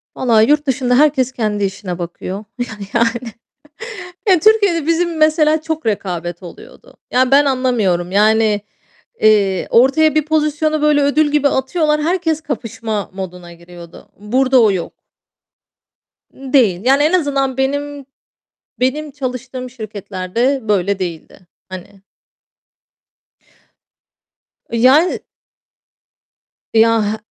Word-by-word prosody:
Vallahi 230 -3 +3
yurt 300 0 +2
dışında 250 -1 +1
herkes 275 -4 +2
kendi 215 -5 -2
işine 190 -2 -4
bakıyor 185 +3 -6 0.2
ya 245 - -1 0.3
yani. 235 0 +1 1.1
Ya, 370 -3 +5
Türkiye'de 400 -6 +3
bizim 335 0 0
mesela 310 0 +3
çok 320 0 -4
rekabet 175 -4 -3
oluyordu. 170 - -14
Yani, 255 +1 +2
ben 285 +1 +5
anlamıyorum. 225 -10 0
Yani, 215 0 +2 0.6
eee, 200 -4 +3
ortaya 275 +6 +3
bir 310 -2 +2
pozisyonu 310 0 0
böyle 300 -1 +3
ödül 290 +1 +2
gibi 295 -1 +2
atıyorlar, 300 +3 0
herkes 325 -1 -1
kapışma 230 -6 -4
moduna 180 -2 -8
giriyordu. 170 +2 -14
Burada 255 +4 +2
o 215 - +4
yok. 180 -3 -4 1.4
Değil. 255 -9 +1
Yani, 275 +3 +4
en 310 +4 +2
azından 275 -6 0
benim 285 +1 -2 0.8
benim 295 +4 -1
çalıştığım 255 -2 -6
şirketlerde 220 +2 -3
böyle 200 -1 +1
değildi, 175 0 -7 0.2
hani. 190 +1 -11 2.7
E, 230 - -3
yani 275 +9 +4 1.5
E, 225 - +4
ya 225 0 +4
he - - -5
255 Hz, 110 wpm, -17 LUFS, 205-295 Hz, 2.7 s, Ya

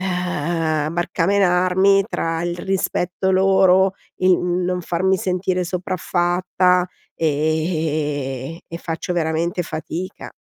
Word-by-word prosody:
barcamenarmi 180 +3 +1
tra 165 -6 -2
il 175 0 -2
rispetto 190 0 -1
loro, 190 0 +4 0.2
il 185 -1 +4
non 180 0 -1
farmi 185 +3 +1
sentire 185 0 -1
sopraffatta 180 0 +1 0.3
e 155 -2 -1
e 165 - -6
faccio 165 +1 -4
veramente 170 +2 0
fatica. 170 +3 -6
180 Hz, 85 wpm, -21 LUFS, 165-185 Hz, 0.3 s, loro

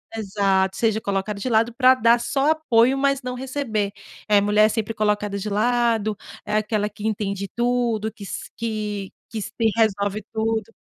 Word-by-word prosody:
exato, 195 -2 +1
seja 220 +1 +1
colocado 200 0 -2
de 255 - -4
lado, 230 +1 +2
pra 255 +1 +5
dar 235 0 +4
só 275 +5 +1
apoio, 265 -5 +3
mas 275 0 +1
não 250 0 -4
receber. 250 -6 -2 0.4
É, 205 -1 +5
mulher 210 +1 +4
é 215 - +3
sempre 225 0 -2
colocada 210 -1 0
de 210 +2 -4
lado, 225 -1 +1 0.3
é 215 - 0
aquela 215 -1 0
que 210 +1 -5
entende 200 -2 -2
tudo, 235 -3 0
que 210 -2 -12
s - - -6
que 210 -3 -3 0.2
que 220 - -4
se - - -7 0.2
resolve 205 -1 +1
tudo. 220 0 -1
220 Hz, 170 wpm, -23 LUFS, 205-235 Hz, 0.4 s, pra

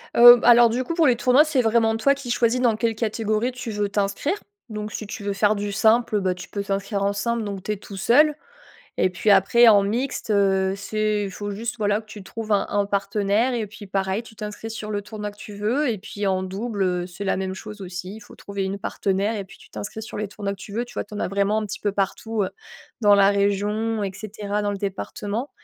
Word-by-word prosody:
Heu, 240 0 +10
alors, 240 -1 +7
du 245 +3 -1
coup, 295 - -3
pour 330 -2 +3
les 250 - +4
tournois 255 +4 +5
c'est 305 -4 +1
vraiment 225 -1 +2
toi 275 +5 +4
qui 275 -3 -8
choisis 240 +1 +2
dans 235 -3 +3
quelle 225 0 0
catégorie 220 +1 -1
tu 245 -2 -6
veux 205 -1 -1
t'inscrire. 205 - -1 0.3
Donc, 210 -1 -5
si 215 - -6
tu 205 - -7
veux 200 0 -1
faire 205 +2 +2
du 205 0 -3
simple, 220 +2 +3
bah, 185 -2 0
tu 180 - -10
peux 200 - -3
t'inscrire 200 0 -2
en 200 0 +1
simple, 235 +2 -1
donc 200 -3 -5
tu 215 - -3
es 210 - -2
tout 195 0 -10
seul. 295 +10 +4 0.6
Et - - +3
puis, 185 +4 +1
après, 200 +5 +6
en 205 -2 +6
mixte, 230 +6 -2
heu, 195 -2 +2
c'est, 210 +1 -1
faut 205 +2 -5
juste, 230 +4 -4
voilà, 205 0 +1
que - - -24
tu 215 -1 -10
trouves 220 +3 -7
un 200 -1 +2
un 205 0 +1
partenaire. 200 +4 0
Et 230 -3 -1
puis, 210 0 -11
pareil, 190 +1 -1
tu 230 -1 -15
t'inscris 210 +1 -6
sur 220 -1 -6
le 205 -1 -2
tournoi 210 0 -6
que 205 - -21
tu 210 0 -10
veux. 240 +8 0
Et 225 - -1
puis, 205 +1 -4
en 190 -1 0
double 190 -3 -2
c'est 180 +2 -8
la 195 - 0
même 190 0 -3
chose 210 +1 -9
aussi, 180 +1 -6
il - - -10
faut 205 - -15
trouver 200 -1 -5
une 195 +1 -3
partenaire 200 +2 -1
et 200 - -5
puis 190 - -15
tu - - -18
t'inscris 210 +2 -6
sur - - -8
les 210 0 -2
tournois 200 0 -4
que 195 - -13
tu 200 - -9
veux. 235 +3 -1
Tu 245 - -14
vois, - - -3
tu 210 - -13
en 205 - -5
as - - 0
vraiment 200 +2 +1
un 215 - -3
petit 205 - -6
peu 205 - 0
partout, 205 +2 -1
heu, - - -2 0.5
dans 205 -2 +6
la 200 0 +5
région 205 +2 0
et 195 - -2
cetera, 205 +1 -4
dans 205 0 -1
le 200 - -4
département. 205 +5 -4
210 Hz, 250 wpm, -23 LUFS, 200-225 Hz, 0.6 s, Heu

